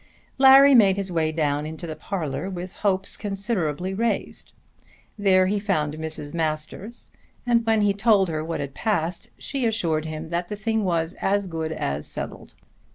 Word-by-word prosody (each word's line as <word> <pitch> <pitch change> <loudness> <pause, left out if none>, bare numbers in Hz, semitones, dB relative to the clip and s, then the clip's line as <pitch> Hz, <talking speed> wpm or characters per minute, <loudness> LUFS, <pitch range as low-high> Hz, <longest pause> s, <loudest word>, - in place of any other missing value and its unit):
Larry 270 +1 +8
made 200 -6 +6
his 195 -2 -3
way 160 -2 +1
down 150 -2 -1
into 160 +2 -7
the 155 -2 -5
parlour 165 +1 -4
with 180 0 -6
hopes 195 -2 0
considerably 190 -4 -2
raised. 230 +4 -2 0.6
There 190 -3 +4
he 205 +2 0
found 155 -8 0
Mrs. 155 -2 -4
Masters 160 +7 -4 0.3
and 235 -1 +3
when 220 -1 +3
he 205 -1 +3
told 205 -1 +3
her 155 -2 -2
what 165 -2 -3
had 140 -1 -5
passed 175 -3 -1
she 275 -2 -3
assured 170 -9 0
him 155 0 -6
that 175 +1 -2
the 210 - -4
thing 220 +1 -1
was 170 -3 0
as 200 +1 +1
good 160 -3 -4
as 70 - -3
settled. - - -7
185 Hz, 165 wpm, -24 LUFS, 160-205 Hz, 0.6 s, Larry